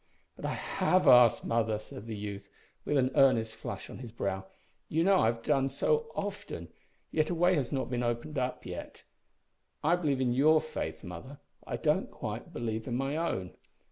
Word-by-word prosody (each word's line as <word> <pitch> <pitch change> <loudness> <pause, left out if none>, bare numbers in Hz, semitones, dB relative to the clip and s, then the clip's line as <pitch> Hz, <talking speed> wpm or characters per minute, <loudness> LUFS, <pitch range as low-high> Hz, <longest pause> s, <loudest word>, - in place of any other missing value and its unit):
"But - - -7
I - - -1
have 185 0 +1
asked, 125 -3 +7
mother," 115 -2 +1
said 105 0 -10
the 110 - -4
youth, 100 -1 -6 0.4
with 150 - +1
an 130 -1 +2
earnest 115 -5 +4
flush 110 - -6
on - - -9
his 120 -3 -8
brow. 95 -4 -3 0.4
"You 160 +2 +2
know 190 +1 +5
I - - +4
have 115 0 -1
done 135 -1 +2
so 460 - 0
often, 200 - -5 0.4
yet 155 -1 +1
a 175 - 0
way 175 +2 +4
has 140 -8 0
not 135 -2 -2
been 120 -1 0
opened 120 +5 -2
up. 125 0 -2 1.2
I 165 +3 +4
believe 150 -6 0
in 125 -2 +2
your 155 +5 +5
faith, 155 0 -5
mother, 95 - -8 0.3
but - - -12
I - - 0
don't - - +1
quite - - -6
believe 110 0 -3
in 120 - -1
my 135 +3 -1
own. 95 - -2
130 Hz, 190 wpm, -31 LUFS, 110-155 Hz, 1.2 s, asked